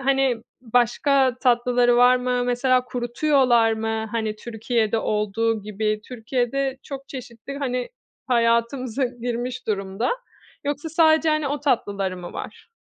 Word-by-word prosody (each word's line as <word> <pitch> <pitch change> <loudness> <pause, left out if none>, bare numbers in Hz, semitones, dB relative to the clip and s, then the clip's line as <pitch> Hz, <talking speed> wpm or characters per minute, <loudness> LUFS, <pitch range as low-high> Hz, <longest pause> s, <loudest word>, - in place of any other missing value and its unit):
hani, 270 -2 +2 0.2
başka 250 +2 +2
tatlıları 245 -1 +3
var 245 +1 +6
mı? 250 0 0
Mesela 250 +1 +2
kurutuyorlar 245 -1 +2
mı, 220 0 -2
hani, 220 -2 -2
Türkiye'de 225 0 -1
olduğu 215 +1 0
gibi? 215 +1 -2
Türkiye'de 255 +3 -1
çok 275 -1 -8
çeşittir. 255 +1 -8
Hani, 250 -3 -2 0.4
hayatımıza 235 +1 +1
girmiş 245 0 -4
durumda. 195 +2 -1 0.5
Yoksa 290 +2 -2
sadece, 320 0 +4
hani, 310 -2 +1
o 290 0 -2
tatlıları 200 -9 0
mı 175 -1 -8
var? - - -8
245 Hz, 120 wpm, -23 LUFS, 225-265 Hz, 0.5 s, var